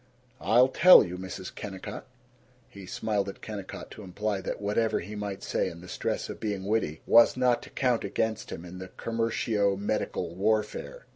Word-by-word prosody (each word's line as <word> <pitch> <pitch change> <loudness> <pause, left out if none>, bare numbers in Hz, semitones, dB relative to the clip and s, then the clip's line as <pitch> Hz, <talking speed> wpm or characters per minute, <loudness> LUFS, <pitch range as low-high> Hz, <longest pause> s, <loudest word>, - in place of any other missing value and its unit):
"I'll 125 +3 +5
tell 180 +7 +8
you, 90 - -5
Mrs. 95 0 -7
Kennicott." 95 -2 -7 0.6
He 100 -2 -12
smiled 105 -1 -1
at 95 - -11
Kennicott, 105 -3 -7
to - - -10
imply 100 +1 -3
that - - -4
whatever 105 +2 +1
he 105 +5 -7
might 100 -1 -5
say - - 0
in 85 0 -11
the 90 - -11
stress - - -2
of - - -7
being 100 -3 -3
witty 100 -7 -1
was 115 +2 +6
not 125 -2 +3
to - - -11
count 125 -4 +1
against 110 +2 -2
him 85 - -7
in 90 +1 -9
the 95 - -7
commercio 115 -2 0
medical 100 -4 -2
warfare. 110 - -1
105 Hz, 175 wpm, -28 LUFS, 95-115 Hz, 0.6 s, tell